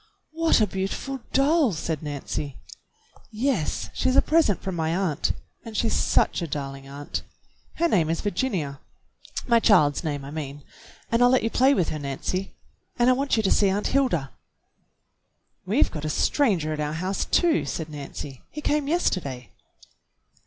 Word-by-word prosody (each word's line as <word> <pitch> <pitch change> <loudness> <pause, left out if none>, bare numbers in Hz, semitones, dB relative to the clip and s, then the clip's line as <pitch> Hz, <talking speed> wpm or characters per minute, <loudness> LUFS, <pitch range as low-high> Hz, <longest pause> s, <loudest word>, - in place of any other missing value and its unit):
"What 325 -2 +3
a - - +5
beautiful 195 +8 -3
doll!" 280 - +3
said 160 -1 -3
Nancy. 145 -1 -4 0.7
"Yes, 225 - -1
she's 255 - +1
a - - +7
present 310 - +3
from 190 - -4
my 160 0 0
aunt. 180 -6 0 0.3
And 225 -2 -7
she's 225 - +1
such - - +2
a 170 - -2
darling 135 -2 -5
aunt! 140 +1 -5 0.5
Her 340 - +2
name 170 - +2
is 165 - 0
Virginia, 180 - -2 0.3
— - - -9
my 235 -2 +5
child's 175 -11 +4
name, 145 -3 -3
I 140 - -8
mean, 145 -2 -6 0.2
— - - -24
and 230 +1 +3
I'll 245 - +7
let 255 0 +3
you 225 - 0
play 265 +2 +4
with 175 - +1
her, 155 - -3
Nancy. 145 +7 -3 0.4
And 245 +1 +5
I - - +6
want 275 -1 0
you 220 - +2
to 195 - +2
see 200 - +4
Aunt 200 +2 0
Hilda." 245 - +1 1.4
"We've - - +3
got 150 - -6
a 155 - -2
stranger 175 - +1
at 155 - -5
our 150 0 -1
house, 185 +4 -2
too," 340 -3 +2
said 160 - -4
Nancy. 140 -2 -8
"He 300 - -7
came 295 -1 0
yesterday." 140 - -1
185 Hz, 175 wpm, -25 LUFS, -, 1.4 s, a